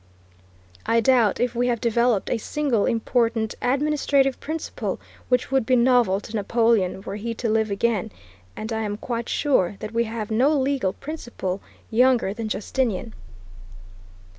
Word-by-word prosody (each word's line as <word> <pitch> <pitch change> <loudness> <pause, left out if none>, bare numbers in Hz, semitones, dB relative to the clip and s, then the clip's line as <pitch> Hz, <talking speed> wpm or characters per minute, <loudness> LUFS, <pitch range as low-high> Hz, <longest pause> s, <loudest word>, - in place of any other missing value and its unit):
I 230 - +4
doubt 235 -3 +3
if 245 -1 0
we 245 +1 0
have 240 -2 0
developed 235 -2 +1
a 235 - 0
single 265 -4 0
important 230 -1 0
administrative 275 0 +1
principle 315 +1 -4 0.3
which 250 +1 +1
would 270 -2 +3
be 255 +3 +2
novel 240 -5 +4
to 215 - -8
Napoleon, 215 -3 +1
were 200 - -5
he 230 +2 -4
to 235 - -2
live 220 0 +1
again, 215 0 0 0.4
and 220 +1 -5
I 220 - -1
am 205 -1 -3
quite 235 0 -4
sure 210 - +1
that 215 - -6
we 235 +1 +1
have 220 -1 -5
no 270 +7 +3
legal 265 -8 0
principle 240 - -5 0.3
younger 245 -3 +3
than 220 0 -4
Justinian. 220 0 -2
230 Hz, 150 wpm, -24 LUFS, 215-255 Hz, 0.4 s, I